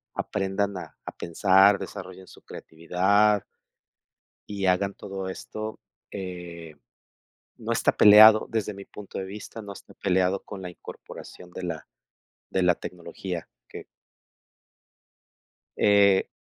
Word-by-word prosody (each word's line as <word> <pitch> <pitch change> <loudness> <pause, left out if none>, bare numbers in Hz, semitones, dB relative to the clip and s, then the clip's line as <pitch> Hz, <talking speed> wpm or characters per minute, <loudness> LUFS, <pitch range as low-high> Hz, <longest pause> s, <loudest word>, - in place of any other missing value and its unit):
aprendan 100 +1 -2
a - - -10
a - - -5
pensar, 95 +3 +4
desarrollen 95 0 -9
su - - -16
creatividad 95 +6 +1 1.1
y 100 -2 -3
hagan 95 +2 +1
todo 95 -1 -6
esto. 110 +3 -7 0.3
Eh, 90 -4 -8 0.8
no - - -5
está - - +2
peleado, 110 +1 +8
desde 110 -2 -2
mi 100 0 -10
punto 105 -2 -9
de 95 - -4
vista, 105 +3 -9
no 100 -1 -8
está - - -15
peleado 95 0 +1
con 100 -2 -9
la 90 - -6
incorporación 90 0 -12
de 95 - -8
la 80 -3 -5 0.6
de 95 - 0
la 90 -1 +4
tecnología 85 0 -7 0.2
que - - -10 1.9
Eh, 100 -2 +4
95 Hz, 120 wpm, -26 LUFS, 90-100 Hz, 1.9 s, peleado